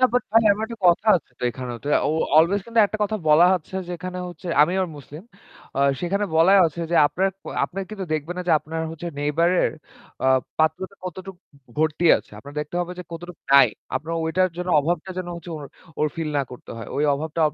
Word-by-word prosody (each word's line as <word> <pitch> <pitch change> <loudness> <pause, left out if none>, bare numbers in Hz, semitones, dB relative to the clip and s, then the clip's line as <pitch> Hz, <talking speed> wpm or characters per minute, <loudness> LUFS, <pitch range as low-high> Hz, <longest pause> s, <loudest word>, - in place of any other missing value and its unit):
না - - +6
বাট 250 - +3
ভাই 225 0 +6
আমার 215 +2 -2
একটা 230 0 -9
কথা 175 +5 +3
আছে 155 - -9
তো - - -13
এখানেও 120 -1 -6
তো - - -11 0.2
ও - - +1 0.3
অলওয়েজ 170 +6 +5
কিন্তু 230 -1 +2
একটা 215 - -6
কথা 215 +1 0
বলা 150 +3 +7
হচ্ছে 185 +1 -6
যে 180 - -6
এখানে 180 +1 -6
হচ্ছে 180 +1 -11 0.2
আমি 170 - +2
আবার 185 - -1
মুসলিম। 145 +4 -11 0.5
অ - - -1 0.2
সেখানে 200 +4 0
বলাই 185 +5 +6
আছে 165 +1 -6
যে - - 0
আপনার 190 +5 0
ক - - -64 0.2
আপনারা 195 +1 -5
কিন্তু 195 -3 -5
দেখবেন 155 +3 -2
না 180 - -2
যে - - +5
আপনার 160 +2 -6
হচ্ছে 165 +2 -7
neighbor 150 +4 +1 0.2
এর - - 0 0.5
আ - - +3 0.3
পাত্রটা 160 +5 0
কতটুকু 185 +1 -7 0.4
ভর্তি 155 +2 0
আছে। - - -10
আপনার 145 +1 -12
দেখতে 150 +3 -7
হবে 175 +1 -3
যে - - -4
কতটুকু 175 +1 -9
নাই। 140 -4 +8 0.3
আপনার 160 +5 -5
ওইটার 185 +3 +2
জন্য 180 0 -4
অভাবটা 175 +4 -2
যেন 185 - -4
হচ্ছে 170 +1 -10
ওর 145 - -8 0.3
ওর 155 - +2
ফিল 165 -2 -2
না 140 - +1
করতে 125 - -11
হয়। 115 - -8
ওই 145 - +1
অভাবটা 160 +3 -4
170 Hz, 220 wpm, -23 LUFS, 155-185 Hz, 0.5 s, নাই